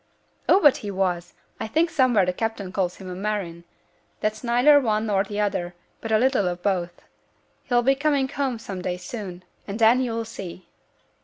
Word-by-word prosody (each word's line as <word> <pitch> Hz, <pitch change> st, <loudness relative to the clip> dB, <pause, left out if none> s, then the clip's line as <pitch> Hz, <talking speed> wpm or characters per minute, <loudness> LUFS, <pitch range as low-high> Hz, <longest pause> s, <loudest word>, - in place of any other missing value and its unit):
'Oh! -, -, +7 dB
but 290 Hz, -8 st, +6 dB
he 205 Hz, -, -6 dB
was. 180 Hz, -3 st, -2 dB, 0.2 s
I 220 Hz, -, -3 dB
think 325 Hz, +8 st, +1 dB
somewhere 250 Hz, -, +3 dB
the 180 Hz, -, -1 dB
captain 215 Hz, -2 st, -3 dB
calls 185 Hz, -3 st, -1 dB
him 190 Hz, -, -11 dB
a 180 Hz, -, -5 dB
marine; 185 Hz, -3 st, -4 dB, 0.5 s
that's 215 Hz, +2 st, -2 dB
neither 250 Hz, +5 st, +5 dB
one 215 Hz, -3 st, 0 dB
nor 200 Hz, -3 st, +2 dB
the 205 Hz, 0 st, -5 dB
other, 180 Hz, -4 st, -1 dB, 0.3 s
but 225 Hz, -, -5 dB
a 220 Hz, -, +5 dB
little 250 Hz, -4 st, +2 dB
of 175 Hz, 0 st, -4 dB
both. 175 Hz, -3 st, -1 dB, 0.6 s
He'll 240 Hz, -1 st, +2 dB
be 270 Hz, +3 st, +4 dB
coming 280 Hz, -1 st, +1 dB
home 265 Hz, -3 st, -2 dB
some 195 Hz, -4 st, -7 dB
day 180 Hz, 0 st, -2 dB
soon; 185 Hz, -2 st, -7 dB, 0.2 s
and 200 Hz, +1 st, -4 dB
then 230 Hz, +3 st, +5 dB
you'll 230 Hz, -2 st, -2 dB
see!' 185 Hz, -4 st, -8 dB
215 Hz, 185 wpm, -24 LUFS, 185-245 Hz, 0.6 s, Oh